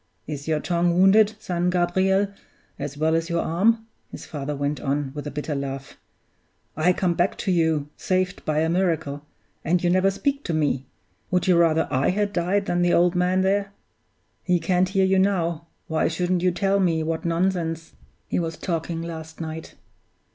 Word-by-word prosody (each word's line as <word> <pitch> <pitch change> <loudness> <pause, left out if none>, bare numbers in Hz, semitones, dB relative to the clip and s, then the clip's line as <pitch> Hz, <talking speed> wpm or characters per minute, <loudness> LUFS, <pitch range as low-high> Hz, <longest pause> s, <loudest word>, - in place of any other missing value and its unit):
"Is 145 -1 -6
your 155 -1 +1
tongue 175 +1 +1
wounded, 210 +3 +5
son 180 -5 -1
Gabriel, 190 +3 +2 0.5
as 145 0 -5
well 160 +1 +1
as 165 +1 0
your 170 0 0
arm?" 220 +7 +2 0.2
his - - -9
father 145 -2 -4
went 145 0 -2
on, 140 0 -1
with 150 0 -6
a - - -2
bitter 150 +2 -4
laugh. 135 -1 -5 0.8
"I 160 +4 +3
come 180 -1 +1
back 175 +3 0
to 190 - -1
you, 160 -4 +1
saved 185 0 -1
by 155 0 0
a 160 - +1
miracle; 160 -5 0 0.4
and 175 +2 +1
you 175 - +3
never 185 +2 +4
speak 280 +8 -1
to 165 - -1
me. 140 -4 0 0.4
Would 180 0 +1
you 185 - +4
rather 165 -1 +3
I 130 0 +2
had 205 +2 0
died 185 +3 +1
than 175 -1 0
the 175 0 +3
old 175 0 +4
man 180 +1 +2
there? 200 +1 0 0.7
He 180 -2 +1
can't 180 +2 +1
hear 190 0 +2
you 190 0 +3
now 170 -4 0 0.2
why 160 - 0
shouldn't 175 +2 0
you 180 - +3
tell 195 +2 +1
me 165 -4 +1
what 160 0 -2
nonsense 170 -1 -1 0.3
he - - -1
was 165 -1 -3
talking 165 -1 -3
last 160 -1 -8
night? 160 0 -6
170 Hz, 185 wpm, -24 LUFS, 160-185 Hz, 0.8 s, wounded